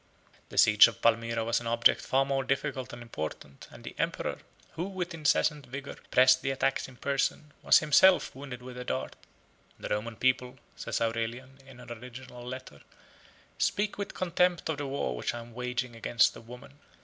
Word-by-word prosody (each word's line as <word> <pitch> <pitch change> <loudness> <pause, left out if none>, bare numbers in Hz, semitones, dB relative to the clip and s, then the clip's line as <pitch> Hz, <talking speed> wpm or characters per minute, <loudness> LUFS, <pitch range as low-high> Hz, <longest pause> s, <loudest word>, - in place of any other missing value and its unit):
The - - -10
siege 105 0 +8
of 115 - -7
Palmyra 115 0 +1
was 115 - +1
an 120 - -7
object 115 0 +4
far 135 +1 +1
more 135 -1 0
difficult 135 -1 -2
and 120 0 -9
important, 80 -9 -7
and - - -14
the - - -8
emperor, - - -2 0.3
who, 170 - -4
with 185 -2 -4
incessant 150 -2 +1
vigor, 140 +3 -7
pressed 130 0 +5
the 135 - -1
attacks 135 0 0
in 130 - -14
person, 140 +3 -1
was - - +6
himself 175 +5 +5
wounded 130 -2 -8
with 125 0 -8
a - - -4
dart. 65 - -3 0.6
"The - - -7
Roman 110 +2 -2
people," 125 +1 0 0.2
says - - -3
Aurelian, 115 +4 -3
in 130 -2 -14
an 120 - -11
original 125 +1 -9
letter, 125 - -8 0.8
"speak 205 0 0
with 200 - -5
contempt 180 -1 +1
of 155 -2 -2
the 145 - -3
war 135 - -2
which - - -3
I - - -5
am 115 0 -11
waging 125 0 -3
against 115 +1 +2
a - - -10
woman. 125 +4 -13
130 Hz, 185 wpm, -29 LUFS, 115-140 Hz, 0.8 s, siege